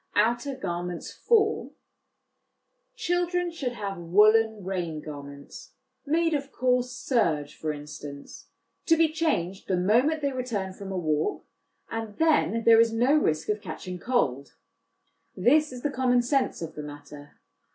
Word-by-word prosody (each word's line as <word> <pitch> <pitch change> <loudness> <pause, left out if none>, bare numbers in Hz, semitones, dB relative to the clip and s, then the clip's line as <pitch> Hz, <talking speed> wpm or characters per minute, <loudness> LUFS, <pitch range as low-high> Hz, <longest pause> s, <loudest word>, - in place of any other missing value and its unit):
Outer 240 +6 +1
Garments 175 -7 -4
for. 440 -2 +1 1.2
Children 355 -4 0
should 270 -7 -3
have 200 -5 -5
woollen 215 +4 +4
rain 175 -5 -3
garments 140 -2 -10 0.3
made 330 +2 +2
of 280 -1 -2
coarse 250 -1 +1
serge, 165 - 0
for 155 - -3
instance, 145 -1 -9 0.4
to 330 - +5
be 325 -1 +4
changed 205 - -1
the 185 - +1
moment 250 - +2
they 280 - +1
return 230 -7 -3
from 195 0 -8
a 190 - -3
walk, 155 -3 -1 0.5
and 225 -2 -5
then 300 -8 +2
there 225 0 +7
is 230 0 +3
no 240 +5 +2
risk 160 - +1
of 210 0 0
catching 180 -3 -7
cold. 140 - -1 0.8
This 295 +9 +4
is 250 -1 -9
the 290 - 0
common 250 -2 +2
sense 260 - 0
of 165 - -6
the 150 - -6
matter. 145 0 -11
225 Hz, 140 wpm, -27 LUFS, 170-275 Hz, 1.2 s, there